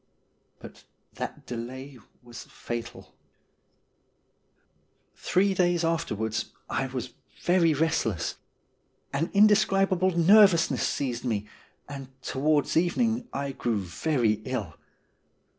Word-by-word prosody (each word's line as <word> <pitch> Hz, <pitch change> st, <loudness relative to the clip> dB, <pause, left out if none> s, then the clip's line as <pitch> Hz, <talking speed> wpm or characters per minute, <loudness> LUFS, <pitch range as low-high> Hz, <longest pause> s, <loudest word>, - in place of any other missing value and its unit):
But -, -, -13 dB, 0.3 s
that -, -, -6 dB
delay 130 Hz, +3 st, -7 dB, 0.2 s
was 120 Hz, -2 st, -10 dB
fatal. 120 Hz, -1 st, -7 dB, 2.0 s
Three 195 Hz, +2 st, +1 dB
days 175 Hz, -2 st, +1 dB
afterwards 110 Hz, -10 st, -2 dB
I 135 Hz, -, -1 dB
was 125 Hz, -1 st, -5 dB, 0.3 s
very 175 Hz, -3 st, +3 dB
restless. 145 Hz, -, -1 dB, 0.8 s
An 160 Hz, +5 st, -1 dB
indescribable 195 Hz, -3 st, +3 dB
nervousness 185 Hz, -1 st, +5 dB
seized 125 Hz, -4 st, -2 dB
me, 110 Hz, -5 st, -1 dB, 0.4 s
and 140 Hz, -2 st, -8 dB, 0.2 s
towards 145 Hz, +2 st, +1 dB
evening 225 Hz, +8 st, +1 dB
I 140 Hz, 0 st, -3 dB
grew 120 Hz, -4 st, -1 dB
very 110 Hz, -, 0 dB
ill. 110 Hz, -11 st, -4 dB
145 Hz, 90 wpm, -27 LUFS, 120-180 Hz, 2.0 s, nervousness